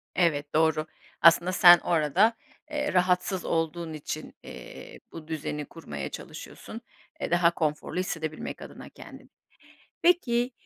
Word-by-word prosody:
Evet, 150 -5 +1
doğru. 160 -1 +2 0.4
Aslında 170 +2 +6
sen 175 -2 +8
orada, 175 +7 +2 0.4
eee, 295 -4 -2
rahatsız 180 0 +1
olduğun 165 0 -2
için, 155 0 -6
eee, - - -11
bu 160 -2 -10
düzeni 150 -2 -4
kurmaya 70 - -7
çalışıyorsun. - - -9 0.4
Eee, - - -3
daha 175 -1 +4
konforlu 155 +1 -2
hissedebilmek 160 -4 -4
adına - - -10
kendini. - - -13 0.7
Peki, 250 -9 +2
165 Hz, 120 wpm, -27 LUFS, 155-185 Hz, 0.7 s, sen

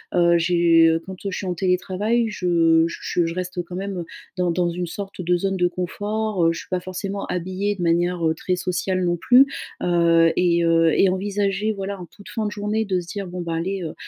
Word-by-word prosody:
heu, 170 -1 +4
j'ai 165 -1 +4
quand, 190 - -7
heu, - - 0
je - - -4
suis - - -5
en 180 - -1
télétravail 190 +6 0
je 165 -4 +3
je 170 +1 -2
je 165 - -4
reste 180 -1 -3
quand 175 +1 -9
même, 190 -1 -4 0.3
dans 180 -1 +1
dans 175 +1 +1
une 175 0 -3
sorte 195 +1 -7
de 175 0 +1
zone 195 +1 -1
de 180 -1 +3
confort. 205 +2 -2
Heu, 165 - +2
j'suis - - -9
pas 185 - +1
forcément 195 +2 -5
habillée 185 +3 -2
de 180 - -4
manière, 170 0 +1
heu, 160 - +2
très 180 +2 -1
sociale 185 +1 -1
non 175 - +1
plus, 250 +9 +6 0.4
heu 170 -1 +4
et 170 -1 +2
heu 165 -1 +4
et 195 - +5
envisager 200 +2 -1
voilà 195 -1 -5
en 175 - -9
toute 200 +5 -15
fin 220 -2 -3
de - - -4
journée 210 +1 -1
de 185 -3 0
se 175 - -11
dire: 200 0 -5
«Bon 180 0 -6
bah 170 -1 -4
allez, 185 +3 -2
heu, 160 - -5
180 Hz, 220 wpm, -22 LUFS, 170-195 Hz, 0.4 s, plus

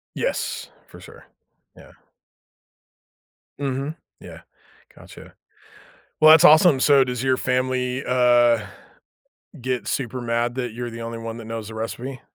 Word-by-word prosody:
Yes, - - -3 0.2
for - - -15
sure, - - -15 0.5
yeah. - - -17 1.7
Mhm. 140 +2 -3 0.2
Yeah. - - -12 0.5
Gotcha. - - -15 0.9
Well, 155 0 +7
that's 160 +1 +7
awesome. 155 -4 +6
So, 140 -2 +5
does 125 -1 -4
your 130 -1 +1
family, 125 0 -1
uh, 120 -3 +3 0.9
get 125 -4 -3
super 130 -1 -3
mad 120 +1 -2
that 125 -3 -4
you're 120 +1 -5
the 115 0 -9
only 115 0 -6
one 115 0 -7
that 115 - -10
knows 115 -1 -6
the 110 - -10
recipe? 120 +3 -6
125 Hz, 130 wpm, -22 LUFS, 115-130 Hz, 1.7 s, Well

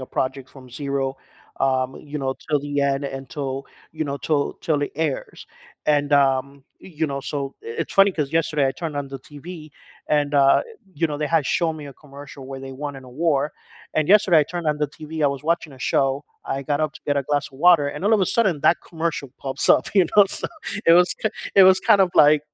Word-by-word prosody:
a 130 - -7
project 130 0 -2
from 130 -2 -13
zero, 140 -1 -2 0.4
um 130 -1 +1 0.2
you 150 - -2
know, 135 -1 -2
till 150 -2 +1
the 145 0 -2
end 140 0 0
until 135 0 -5 0.3
you 155 0 -3
know, 140 -1 -3
till 145 0 0 0.2
till 150 -3 0
it 145 - -3
airs. 155 -2 -3 0.4
And, 145 -1 +2
um 140 0 +2
you 160 -3 -4
know, 140 -1 -4
so 140 0 -4
it's 115 - -5
funny 195 0 +6
'cause 150 -4 -3
yesterday 155 -3 +1
I 135 - 0
turned 155 +1 -5
on 140 -1 -3
the 135 0 -7
TV 155 +2 -10 0.4
and, 145 -1 +1
uh 140 -1 +5 0.3
you 165 +3 +1
know, 150 -2 -4
they 150 - -1
had 150 - +1
shown 165 -2 0
me 150 - -8
a 140 - -9
commercial 140 -1 -12
where 135 0 -7
they 135 - -7
won 145 +1 -6
an 135 - -11
award, 145 +2 0 0.4
and 155 -1 +1
yesterday 190 -4 +6
I 150 - +1
turned 175 0 -5
on 150 -1 +1
the 150 - +1
TV, 155 0 -5
I 145 - +5
was 140 - -10
watching 170 -3 -1
a 130 - -14
show, 135 0 +1 0.2
I 135 - -3
got 145 +2 -1
up 155 -1 0
to - - -12
get 145 - +1
a 140 - +1
glass 145 -1 +1
of 135 - -15
water 170 -2 +5
and 180 - -6
all 210 - +3
of 210 - +2
a 185 - +2
sudden 190 -10 +2
that 170 - +4
commercial 165 -4 -3
pops 135 -1 -2
up, - - +5
you 190 -4 +5
know? 205 - +9
So, 195 - -5 0.4
it 165 - +7
was 180 - +2
k 220 - +2 0.3
it 195 - +8
was 185 - +3
kind 205 -2 +7
of 185 -2 +4
like, 150 0 +6
145 Hz, 230 wpm, -22 LUFS, 135-160 Hz, 0.4 s, know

